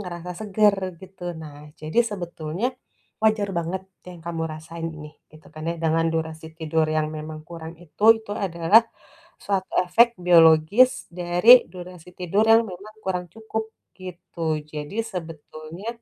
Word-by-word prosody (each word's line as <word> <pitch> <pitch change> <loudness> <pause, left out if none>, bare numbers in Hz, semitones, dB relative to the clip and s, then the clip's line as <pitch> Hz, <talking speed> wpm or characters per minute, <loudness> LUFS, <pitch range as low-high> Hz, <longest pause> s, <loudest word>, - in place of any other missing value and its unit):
ngerasa 180 -2 -7
segar 210 -1 +3 0.2
gitu. 190 -1 -14 0.2
Nah 150 -2 -10 0.2
jadi 155 +8 -3
sebetulnya 175 +2 -3 0.6
wajar 215 -2 +2
banget 175 +3 -3 0.2
yang 180 -2 -11
kamu 165 -1 -3
rasain 165 +1 -7
nih 150 -1 -11 0.2
gitu 155 0 -17
kan 155 - -8
ya. - - -2
Dengan 165 0 +1
durasi 160 0 -4
tidur 160 -1 +1
yang 155 0 0
memang 155 0 -7
kurang 165 -1 -8
itu, 175 +5 -6 0.2
itu 205 -2 -8
adalah 185 +4 +4 0.6
suatu 195 -2 -2
efek 230 +7 +5 0.2
biologis 165 +8 +5
dari 175 +5 +2 0.2
durasi 180 -1 -11
tidur 190 +4 +1
yang 225 +1 +6
memang 200 +4 -11
kurang 180 -2 -2
cukup 220 0 -4 0.3
gitu. 170 -3 -4
Jadi 150 +5 -6 0.2
sebetulnya, 165 +2 -8
175 Hz, 140 wpm, -24 LUFS, 160-195 Hz, 0.6 s, yang